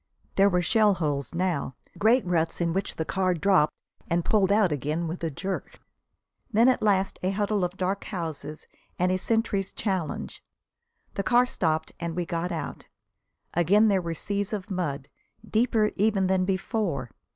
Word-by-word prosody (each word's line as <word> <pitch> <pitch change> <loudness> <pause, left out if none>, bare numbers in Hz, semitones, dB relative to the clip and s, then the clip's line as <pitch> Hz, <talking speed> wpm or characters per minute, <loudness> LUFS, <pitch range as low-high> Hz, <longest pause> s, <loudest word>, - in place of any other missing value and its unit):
There 195 +1 +5
were 180 -2 +1
shellholes 170 - +1
now, 170 -7 -1 0.2
great 230 +3 +3
ruts 165 -2 0
into 170 -1 0
which 195 +1 -2
the 160 - -2
car 185 0 +1
dropped 180 -2 +3 0.3
and 170 0 +1
pulled 200 -3 +3
out 205 -4 +4
again 150 +4 -1
with 170 +2 -5
a 165 - 0
jerk. 190 +6 -5 0.7
Then 230 +3 +5
at 260 - +3
last 195 -2 +1
a 185 - 0
huddle 205 0 0
of 180 +1 -2
dark 190 +1 -1
houses 160 -5 -5 0.3
and 180 +1 +2
a 185 - +2
sentry's 215 -2 0
challenge. 190 -7 -3 0.7
The - - -1
car 240 +6 +4
stopped 160 -9 -1
and 170 -2 -3
we 175 -1 -1
got 170 +2 -2
out. 165 - -5 0.7
Again 200 +6 +4
there 195 -2 +2
were 170 -1 -4
seas 205 +4 -2
of 200 -1 -4
mud, 145 -7 -2 0.4
deeper 220 -1 +2
even 205 -1 +2
than 185 0 +2
before. 185 - -2
185 Hz, 160 wpm, -26 LUFS, 170-205 Hz, 0.7 s, There